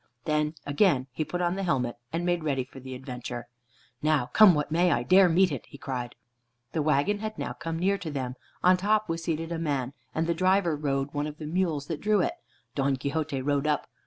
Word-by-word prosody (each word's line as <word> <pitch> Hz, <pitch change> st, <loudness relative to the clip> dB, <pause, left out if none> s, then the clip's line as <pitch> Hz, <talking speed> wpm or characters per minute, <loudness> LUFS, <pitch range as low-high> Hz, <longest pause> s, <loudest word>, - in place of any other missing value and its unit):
Then 150 Hz, 0 st, 0 dB
again 145 Hz, -3 st, +3 dB
he 145 Hz, +5 st, -2 dB
put 180 Hz, +3 st, -3 dB
on 175 Hz, 0 st, +1 dB
the 195 Hz, -, -3 dB
helmet, 130 Hz, -10 st, 0 dB
and 170 Hz, +1 st, -2 dB
made 175 Hz, -2 st, +1 dB
ready 135 Hz, -4 st, 0 dB
for 135 Hz, +1 st, -13 dB
the 130 Hz, 0 st, -7 dB
adventure. 125 Hz, -2 st, -6 dB, 0.5 s
"Now 150 Hz, -5 st, +1 dB
come 210 Hz, -6 st, +8 dB
what 150 Hz, 0 st, -1 dB
may, 175 Hz, +2 st, +3 dB
I 120 Hz, -, +1 dB
dare 185 Hz, +8 st, +6 dB
meet 180 Hz, +1 st, +4 dB
it," 140 Hz, -, -5 dB
he -, -, -12 dB
cried. 125 Hz, -2 st, -4 dB, 0.6 s
The 160 Hz, -, 0 dB
wagon 155 Hz, +7 st, +2 dB
had 215 Hz, 0 st, -5 dB
now -, -, -3 dB
come 165 Hz, 0 st, -4 dB
near 195 Hz, +3 st, +1 dB
to 160 Hz, -, -5 dB
them. 130 Hz, -4 st, -3 dB, 0.3 s
On 180 Hz, 0 st, +6 dB
top 215 Hz, +3 st, +2 dB
was 165 Hz, 0 st, -3 dB
seated 165 Hz, 0 st, -2 dB
a 165 Hz, -, -2 dB
man, 140 Hz, -5 st, -1 dB, 0.2 s
and 160 Hz, -, +1 dB
the 170 Hz, -, +1 dB
driver 185 Hz, -1 st, +2 dB
rode 140 Hz, -1 st, -1 dB
one 145 Hz, 0 st, -1 dB
of 150 Hz, 0 st, -7 dB
the 155 Hz, -, -7 dB
mules 160 Hz, -3 st, 0 dB
that 155 Hz, -1 st, -4 dB
drew 210 Hz, -1 st, +3 dB
it. 175 Hz, -, +1 dB, 0.4 s
Don 135 Hz, -1 st, +1 dB
Quixote 140 Hz, +1 st, -2 dB
rode 145 Hz, +1 st, +1 dB
up. 150 Hz, -1 st, +1 dB
155 Hz, 220 wpm, -28 LUFS, 140-175 Hz, 0.6 s, come